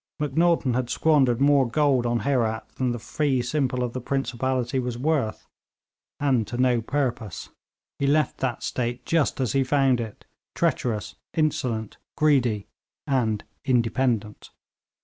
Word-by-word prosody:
Macnaghten 150 Hz, -2 st, +2 dB
had 125 Hz, 0 st, -1 dB
squandered 135 Hz, -6 st, +3 dB
more 140 Hz, -2 st, +4 dB
gold 135 Hz, -2 st, +2 dB
on 120 Hz, 0 st, 0 dB
Herat 115 Hz, -5 st, 0 dB
than 130 Hz, -1 st, 0 dB
the 120 Hz, -, -2 dB
fee 130 Hz, +3 st, 0 dB
simple 125 Hz, -1 st, 0 dB
of 120 Hz, -1 st, -3 dB
the 130 Hz, -, -4 dB
principality 130 Hz, 0 st, -1 dB
was 125 Hz, -2 st, -3 dB
worth, 135 Hz, -5 st, -1 dB, 0.7 s
and 130 Hz, -6 st, +1 dB
to 120 Hz, -, -5 dB
no 125 Hz, -2 st, +3 dB
purpose; 120 Hz, -, -3 dB, 0.5 s
he 140 Hz, -, +1 dB
left 150 Hz, 0 st, +2 dB
that 130 Hz, -3 st, -2 dB
state 120 Hz, 0 st, -3 dB
just 165 Hz, -5 st, +1 dB
as 130 Hz, -4 st, 0 dB
he 135 Hz, -1 st, +3 dB
found 135 Hz, -2 st, +2 dB
it, 110 Hz, -3 st, -8 dB, 0.3 s
treacherous, 110 Hz, -3 st, -1 dB, 0.2 s
insolent, 125 Hz, -8 st, -1 dB, 0.2 s
greedy 125 Hz, -9 st, +2 dB, 0.4 s
and 115 Hz, -6 st, 0 dB, 0.2 s
independent. 120 Hz, -3 st, 0 dB
125 Hz, 135 wpm, -25 LUFS, 120-140 Hz, 0.7 s, more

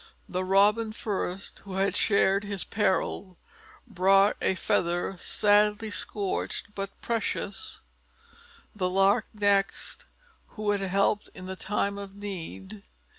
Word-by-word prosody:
The 185 Hz, +1 st, -2 dB
Robin 210 Hz, +4 st, +3 dB
first, 195 Hz, -3 st, -3 dB
who 195 Hz, -2 st, -8 dB
had 195 Hz, +1 st, +1 dB
shared 200 Hz, -1 st, +3 dB
his 200 Hz, -2 st, -3 dB
peril, 190 Hz, -2 st, -1 dB, 0.5 s
brought 195 Hz, -2 st, +4 dB
a 190 Hz, -, +2 dB
feather 175 Hz, +1 st, 0 dB
sadly 210 Hz, +2 st, +3 dB
scorched, 205 Hz, 0 st, -2 dB
but 195 Hz, -1 st, -6 dB
precious; 220 Hz, -3 st, -2 dB, 0.9 s
the 185 Hz, -3 st, 0 dB
Lark 195 Hz, +4 st, +3 dB
next, 205 Hz, -1 st, 0 dB, 0.5 s
who 210 Hz, -1 st, 0 dB
had 200 Hz, -1 st, 0 dB
helped 200 Hz, +2 st, +1 dB
in 185 Hz, -, -8 dB
the 190 Hz, 0 st, -5 dB
time 200 Hz, +2 st, -1 dB
of 200 Hz, -1 st, -8 dB
need. 200 Hz, +1 st, -7 dB
200 Hz, 120 wpm, -28 LUFS, 190-205 Hz, 0.9 s, brought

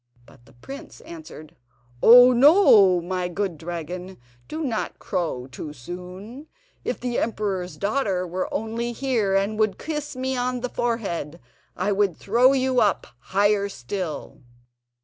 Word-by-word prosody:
But 120 Hz, -, -20 dB
the 135 Hz, -, -19 dB
prince 270 Hz, -, -11 dB
answered, 315 Hz, -, -11 dB, 0.5 s
"Oh, 245 Hz, +2 st, +9 dB
ho! 220 Hz, -, +6 dB
my 180 Hz, +1 st, -2 dB
good 185 Hz, 0 st, -3 dB
dragon, 175 Hz, +3 st, -6 dB, 0.3 s
do 315 Hz, +1 st, -4 dB
not 235 Hz, -6 st, -3 dB
crow 165 Hz, -, -3 dB
too 145 Hz, +3 st, -8 dB
soon! 180 Hz, -, -9 dB, 0.4 s
If -, -, -3 dB
the 245 Hz, -1 st, -2 dB
emperor's 195 Hz, -5 st, -2 dB
daughter 200 Hz, -4 st, -1 dB
were 180 Hz, +1 st, -4 dB
only 230 Hz, +2 st, -3 dB
here, 230 Hz, -7 st, 0 dB
and 200 Hz, +2 st, 0 dB
would 215 Hz, -3 st, +1 dB
kiss 300 Hz, -3 st, -5 dB
me 260 Hz, +1 st, -2 dB
on 250 Hz, 0 st, -2 dB
the 250 Hz, -, -3 dB
forehead, 195 Hz, -11 st, -3 dB, 0.4 s
I 185 Hz, +3 st, 0 dB
would 200 Hz, -3 st, +1 dB
throw 240 Hz, +6 st, +4 dB
you 260 Hz, -1 st, +1 dB
up 205 Hz, -, +1 dB
higher 200 Hz, +6 st, +1 dB
still!" 170 Hz, +2 st, -6 dB
205 Hz, 140 wpm, -24 LUFS, 180-245 Hz, 0.5 s, Oh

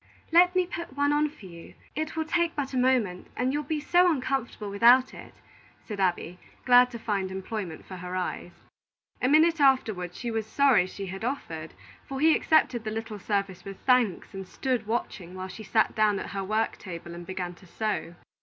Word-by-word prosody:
"Let 355 Hz, +2 st, +5 dB
me 365 Hz, -1 st, +3 dB
put 340 Hz, -5 st, -7 dB
one 285 Hz, 0 st, +2 dB
on 300 Hz, +1 st, +2 dB
for 285 Hz, -9 st, -15 dB
you. 170 Hz, -2 st, -12 dB, 0.2 s
It 310 Hz, +1 st, -3 dB
will 320 Hz, -1 st, -1 dB
take 340 Hz, +1 st, 0 dB
but 280 Hz, -2 st, -3 dB
a -, -, -1 dB
moment, 250 Hz, -8 st, +1 dB
and 255 Hz, +1 st, 0 dB
you'll 295 Hz, -, 0 dB
be 310 Hz, 0 st, -2 dB
so 355 Hz, +4 st, +4 dB
uncomfortable 255 Hz, -8 st, -2 dB
without 240 Hz, +5 st, +5 dB
it," -, -, -12 dB, 0.5 s
said 210 Hz, -3 st, -5 dB
Abby, 180 Hz, -1 st, -1 dB, 0.3 s
glad 250 Hz, 0 st, +7 dB
to 240 Hz, -, -7 dB
find 200 Hz, -4 st, -2 dB
employment 190 Hz, -3 st, -5 dB
for 185 Hz, -, -9 dB
her 180 Hz, +1 st, -6 dB
eyes. 180 Hz, -1 st, -3 dB, 0.7 s
A 250 Hz, -, +2 dB
minute 320 Hz, +2 st, +4 dB
afterward 220 Hz, -10 st, +2 dB
she 240 Hz, -2 st, -4 dB
was 220 Hz, -1 st, -2 dB
sorry 260 Hz, -7 st, +4 dB
she 195 Hz, +1 st, -7 dB
had 190 Hz, +2 st, -7 dB
offered; 165 Hz, -, -4 dB, 0.3 s
for 270 Hz, -1 st, -5 dB
he 315 Hz, +2 st, +5 dB
accepted 255 Hz, -7 st, +2 dB
the 220 Hz, -, -3 dB
little 220 Hz, -1 st, -5 dB
service 195 Hz, -2 st, -2 dB
with 195 Hz, -1 st, -8 dB
thanks, 250 Hz, -9 st, +2 dB
and 195 Hz, -1 st, -7 dB
stood 250 Hz, -2 st, -2 dB
watching 190 Hz, -6 st, -3 dB
while 185 Hz, 0 st, -5 dB
she 185 Hz, -, -9 dB
sat 220 Hz, +2 st, +1 dB
down 215 Hz, -2 st, +2 dB
at -, -, -6 dB
her 195 Hz, -1 st, -3 dB
work 215 Hz, +3 st, -1 dB
table 170 Hz, -2 st, -8 dB
and 175 Hz, 0 st, -9 dB
began 185 Hz, -2 st, -4 dB
to 180 Hz, +1 st, -18 dB
sew. 190 Hz, -4 st, -3 dB
220 Hz, 200 wpm, -27 LUFS, 190-270 Hz, 0.7 s, glad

